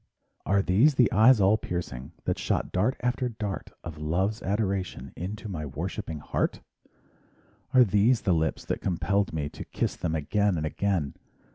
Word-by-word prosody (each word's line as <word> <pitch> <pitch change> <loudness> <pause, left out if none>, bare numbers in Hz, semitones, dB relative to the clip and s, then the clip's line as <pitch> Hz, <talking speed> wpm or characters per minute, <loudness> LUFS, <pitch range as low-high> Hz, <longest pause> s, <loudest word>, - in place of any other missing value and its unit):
Are 100 0 +3
these 120 +12 +4
the 125 -5 +4
eyes 115 +4 +6
all 100 +2 +5
piercing 85 - -5
That - - -1
shot - - -1
dart 105 +8 +1
after 125 0 0
dart 105 -4 -5
Of 80 -2 -7
love - - -6
and 75 - -3
love's 95 +7 0
adoration 95 - -2
Into 105 +5 -5
my 85 -6 -4
worshiping 80 +2 -5
heart? - - -1 1.1
Are 130 -1 +7
these 110 +3 +3
the 95 - +2
lips 80 -1 0
that - - -2
compelled 95 +3 0
me 75 -3 -2
To - - -8
kiss - - -2
them 80 -1 -2
again 100 +5 +1
and 80 - -1
again? 85 -3 -1
95 Hz, 170 wpm, -27 LUFS, 80-105 Hz, 1.1 s, Are